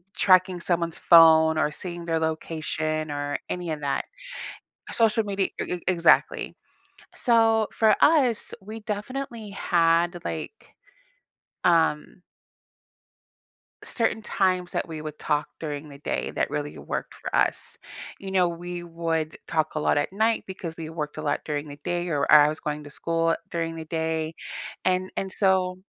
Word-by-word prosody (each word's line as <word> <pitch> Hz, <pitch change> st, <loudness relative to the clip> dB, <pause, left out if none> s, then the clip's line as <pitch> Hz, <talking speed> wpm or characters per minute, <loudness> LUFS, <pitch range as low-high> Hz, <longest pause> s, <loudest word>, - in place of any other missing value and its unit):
tracking 185 Hz, -1 st, +4 dB
someone's 170 Hz, -2 st, -1 dB
phone, 160 Hz, -1 st, +7 dB
or 155 Hz, -1 st, +1 dB
seeing 175 Hz, +1 st, -7 dB
their 165 Hz, -1 st, 0 dB
location, 155 Hz, -1 st, -2 dB
or 145 Hz, 0 st, -2 dB
any 175 Hz, -2 st, -3 dB
of 150 Hz, -1 st, -4 dB
that. 140 Hz, -1 st, -1 dB, 0.9 s
Social 225 Hz, -1 st, +3 dB
media 200 Hz, -2 st, 0 dB
e -, -, -2 dB
e 180 Hz, -, -6 dB
exactly. 170 Hz, -2 st, +3 dB, 0.6 s
So 225 Hz, -3 st, +3 dB
for 220 Hz, -1 st, +4 dB
us, 270 Hz, -8 st, +3 dB
we 215 Hz, +3 st, -8 dB
definitely 220 Hz, +1 st, -5 dB
had, 170 Hz, -2 st, +2 dB
like, 160 Hz, -, -6 dB, 0.9 s
um 165 Hz, -1 st, +2 dB, 1.6 s
certain 225 Hz, -2 st, 0 dB
times 185 Hz, -3 st, 0 dB
that -, -, -2 dB
we 160 Hz, -2 st, -6 dB
would 155 Hz, -1 st, -7 dB
talk 150 Hz, -1 st, 0 dB
during 150 Hz, -1 st, -5 dB
the 140 Hz, -, -11 dB
day -, -, -2 dB
that -, -, -1 dB
really 145 Hz, 0 st, -4 dB
worked -, -, -5 dB
for -, -, -5 dB
us. -, -, 0 dB, 0.4 s
You 195 Hz, -1 st, -7 dB
know, 185 Hz, -2 st, +3 dB
we 175 Hz, +1 st, -5 dB
would 165 Hz, -2 st, -2 dB
talk 155 Hz, -1 st, 0 dB
a -, -, 0 dB
lot 150 Hz, -, +2 dB
at 145 Hz, -, -1 dB
night, 220 Hz, +2 st, +1 dB
because 180 Hz, -3 st, -6 dB
we 160 Hz, -1 st, -6 dB
worked 155 Hz, -2 st, -5 dB
a -, -, -3 dB
lot 150 Hz, -1 st, -1 dB
during 150 Hz, 0 st, -3 dB
the 145 Hz, 0 st, -9 dB
day, 175 Hz, 0 st, -2 dB
or 145 Hz, -5 st, 0 dB
I 150 Hz, -1 st, +9 dB
I -, -, +3 dB
was 155 Hz, -, -5 dB
going 150 Hz, 0 st, -4 dB
to -, -, -9 dB
school 165 Hz, +1 st, 0 dB, 0.2 s
during 165 Hz, -1 st, -2 dB
the 160 Hz, -1 st, -7 dB
day. 160 Hz, 0 st, -2 dB, 0.5 s
And 185 Hz, 0 st, +1 dB
and 190 Hz, -1 st, -2 dB
so 185 Hz, -2 st, +1 dB
170 Hz, 155 wpm, -25 LUFS, 155-190 Hz, 1.6 s, I